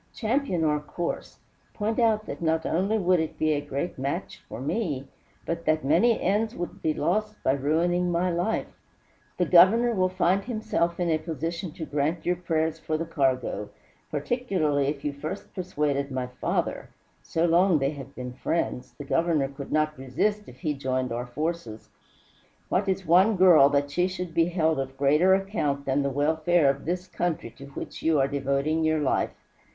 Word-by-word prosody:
Champion 225 - 0
our 150 -1 +2
course, 170 +3 -5 0.4
point 220 +2 -1
out 220 -2 +2
that - - -7
not 160 -1 +1
only 195 +6 +1
would 185 -3 +3
it 160 -1 -3
be 155 0 +1
a 145 - -1
great 145 +3 -4
match 140 +2 -4
for - - -7
me, 140 - -2 0.4
but 170 0 -3
that 155 -2 +1
many 185 +11 +4
ends 215 +5 0
would 175 - -6
be 160 - +1
lost 210 +7 -1
by - - +3
ruining 165 +6 +1
my 175 +1 +1
life. 175 +6 0 0.7
The 180 - +2
Governor 200 +8 +6
will 185 -3 +2
find 185 +1 +1
himself 180 -8 -1
in 175 -2 +1
a 155 - +2
position 165 +2 -4
to 165 -2 -6
grant 150 +3 -1
your 180 - +2
prayers 160 -2 -1
for 155 0 -2
the 165 - -3
cargo, 130 -9 -1 0.4
particularly 155 - 0
if 145 0 -3
you 145 - -1
first 140 +2 -6
persuaded 150 -6 -1
my 130 -2 -2
father 125 0 -2 0.3
so 165 +1 0
long 175 +1 +4
they 135 0 0
have 140 -2 -10
been 125 -1 -6
friends, 130 -2 -2
the 145 - -7
Governor 155 -2 +1
could 140 0 -9
not 155 0 +1
resist 205 +12 -1
if - - -15
he 155 -4 0
joined 130 -2 -2
our 120 +2 -3
forces. 140 -4 -4 0.8
What 195 +2 +1
is 190 0 -1
one 185 +6 +5
girl 175 -7 +7
that 145 0 0
she 180 +4 +2
should 180 -2 -5
be 165 0 +3
held 160 -4 +1
of 135 0 -4
greater 150 +7 +4
account 150 -8 -2
than 135 +1 +1
the 140 - 0
welfare 155 +2 +2
of 140 - -9
this 180 +3 -2
country 175 -10 -2
to 135 +4 -12
which 140 - -8
you 160 -2 +2
are 135 - +3
devoting 140 +3 0
your 155 0 +2
life? 145 - 0
160 Hz, 180 wpm, -26 LUFS, 140-180 Hz, 0.8 s, girl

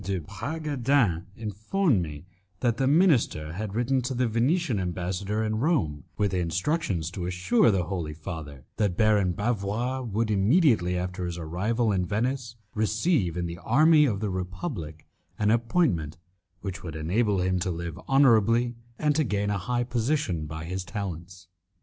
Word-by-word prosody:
de 95 +1 -1
Bragadin 125 - 0
informed 110 - 0
me 75 -1 -6 0.4
that 120 -2 +1
the 135 - +1
minister 135 - +3
had 105 +2 -5
written 125 +3 +1
to 125 +1 -3
the 125 0 +1
Venetian 125 - +1
ambassador 95 +4 -2
in 110 0 -1
Rome 105 - 0
with 100 -2 0
instructions 90 - -1
to 90 -1 -4
assure 90 +6 +3
the 95 -4 +2
Holy 85 -4 -4
Father 75 -5 -8
that 100 -5 0
Baron 105 -4 +3
Bavois 115 +5 -1
would, 115 -2 -1
immediately 105 - +3
after 90 0 -3
his 85 0 -5
arrival 105 +8 0
in 95 -2 +1
Venice, 120 +5 -2 0.2
receive 110 - +1
in 90 - -1
the 85 0 -6
army 150 - +5
of 105 -7 -1
the 105 -3 -1
Republic 90 - -5 0.3
an 105 0 +2
appointment 115 - +1 0.4
which 95 -1 -5
would 80 -4 -7
enable 100 +6 +1
him 90 0 +1
to 90 +1 -1
live 85 -2 -4
honourably 120 -3 +4 0.2
and 150 -1 +1
to 155 - +3
gain 105 -4 -1
a 100 - -1
high 120 +6 -1
position 120 - -1
by 80 +1 -6
his 90 +2 -3
talents. 90 -2 -6
100 Hz, 155 wpm, -27 LUFS, 90-120 Hz, 0.4 s, army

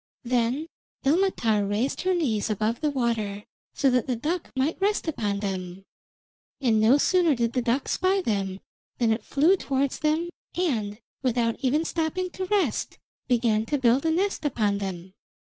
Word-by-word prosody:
Then 245 +4 0 0.4
Ilmatar 270 - +2
raised 220 +7 -1
her 370 0 +1
knees 225 - 0
above 215 +4 -1
the 305 - +2
water, 230 -6 -1 0.3
so 270 -2 +3
that 250 -2 +1
the 255 - 0
duck 320 +9 -3
might 280 +8 0
rest 410 -2 +1
upon 205 -10 -1
them; 190 -1 -4 0.7
and 235 -6 +2
no 235 +6 +6
sooner 340 0 +3
did 235 -1 0
the 250 - +1
duck 245 +3 0
spy 375 +2 +2
them 195 - -2 0.4
than 230 -2 +2
it 220 - -1
flew 315 +7 +3
towards 275 -6 -1
them 315 +3 +1 0.3
and, 225 - -1 0.2
without 240 -3 +1
even 295 +5 +1
stopping 340 +3 -2
to 375 - -4
rest, 400 0 0 0.3
began 230 -3 +2
to 290 - 0
build 255 0 +3
a 325 - +1
nest 370 +3 0
upon 215 -8 0
them. 185 -2 -6
255 Hz, 160 wpm, -26 LUFS, 220-320 Hz, 0.7 s, no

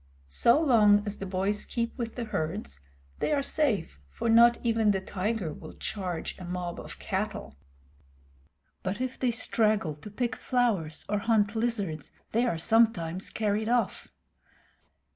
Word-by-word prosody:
So 235 - +4
long 215 -9 +5
as 205 0 -4
the 195 - -4
boys 195 +3 0
keep 235 -1 -3
with 230 -2 -4
the 245 - -3
herds 170 - -3 0.4
they - - 0
are 285 -2 +2
safe, 245 - 0
for 230 - -3
not 235 +1 +7
even 225 -2 +2
the 195 -2 +2
tiger 190 -2 -2
will - - -10
charge 185 -5 -4
a - - -8
mob 175 -1 -4
of - - -8
cattle. - - -4 1.3
But 190 +4 -3
if 255 0 -3
they 255 - +2
straggle 215 -6 +1
to 150 +8 -11
pick 240 +4 -2
flowers 215 - 0
or 210 0 0
hunt 210 -1 +2
lizards, 205 -10 -1 0.2
they 235 +3 +2
are 170 - 0
sometimes 190 -3 +2
carried 215 0 -1
off. 240 -4 0
210 Hz, 150 wpm, -28 LUFS, 185-235 Hz, 1.3 s, not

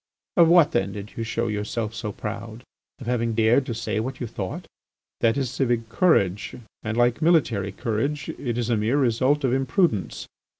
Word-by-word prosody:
Of 170 -3 +6
what 170 -2 +6
then 95 +1 0
did 105 0 -8
you 115 - -3
show 115 +1 -2
yourself 105 +1 -3
so 110 -1 -4
proud? 110 +3 -7 0.3
Of 130 - -10
having 115 -2 0
dared 115 +4 +3
to 115 - -3
say 110 -1 -2
what 130 +4 -4
you 125 - -3
thought? 100 -5 -5 0.5
That 115 +2 +2
is 130 -3 -1
civic 120 -4 -1
courage, 105 - +2 0.3
and, 110 +1 -3
like 120 +3 +2
military 125 - +2
courage, 125 +6 -2
it 120 -4 -4
is 120 0 -1
a 115 - +2
mere 110 +6 +1
result 130 +2 +2
of 130 -2 +2
imprudence. 135 - 0
115 Hz, 180 wpm, -24 LUFS, 110-135 Hz, 0.5 s, Of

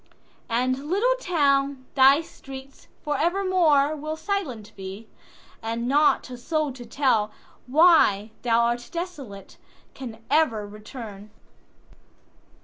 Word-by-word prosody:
And, 255 +5 -1
little 435 +8 +3
town, 280 - +1
thy 275 +3 +6
streets 270 -3 -12 0.2
for 295 -1 -1
evermoreWill 315 -4 +2
silent 295 - -4
be; 195 +3 -8 0.5
and 230 +1 -3
not 295 +3 +3
a 250 - -6
soul 305 +1 -1
to 245 -2 -10
tellWhy 235 - +2
thou 235 -1 +3
art 240 +1 -1
desolate, 295 - -7 0.4
can 240 -5 -8 0.2
e'er 250 -10 +2
return. 210 0 -10
270 Hz, 100 wpm, -25 LUFS, 230-310 Hz, 0.5 s, thy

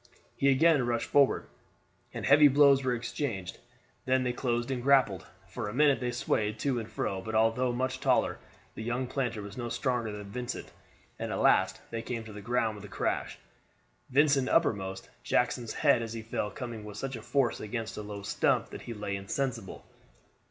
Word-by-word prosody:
He 140 - +3
again 145 +1 +4
rushed 120 -1 0
forward, 140 -2 +3 0.7
and - - -5
heavy 145 +2 +7
blows 140 -1 +5
were 125 -1 +1
exchanged; 115 -5 -4 0.5
then 130 0 +2
they 125 -1 0
closed 120 0 -1
and 125 -2 -2
grappled. 130 -8 +3 0.2
For 105 +3 -5
a 105 - -7
minute 145 -1 +4
they 125 - -2
swayed 110 -3 -1
to 135 -4 0
and 110 - -7
from 95 -1 -2
but 110 +1 -4
although 115 +3 +3
much 130 +2 -2
taller, - - +2 0.3
the - - -7
young 120 +3 -1
planter 120 -5 -2
was 100 +2 -9
no 120 -1 -3
stronger 120 -3 -1
than 105 0 -6
Vincent, 125 +1 -5 0.5
and - - -3
at - - -1
last - - +3
they 115 -1 -3
came 115 0 -4
to 110 -1 -10
the 105 - -8
ground 110 0 0
with 105 - -10
a - - -8
crash, 100 - -2 0.7
Vincent 140 -1 +3
uppermost, 95 - +1 0.2
Jackson's 125 -2 0
head 120 - +4
as 115 -1 -5
he 115 -1 -6
fell 110 -2 -2
coming 115 -3 -7
with 105 -1 -9
such 135 +3 -4
force 125 +2 0
against 110 +1 -4
a - - -5
low 105 -1 -7
stump - - +1
that - - -8
he 115 - -7
lay 105 -1 -3
insensible. 115 +2 -4
120 Hz, 185 wpm, -30 LUFS, 105-130 Hz, 0.7 s, heavy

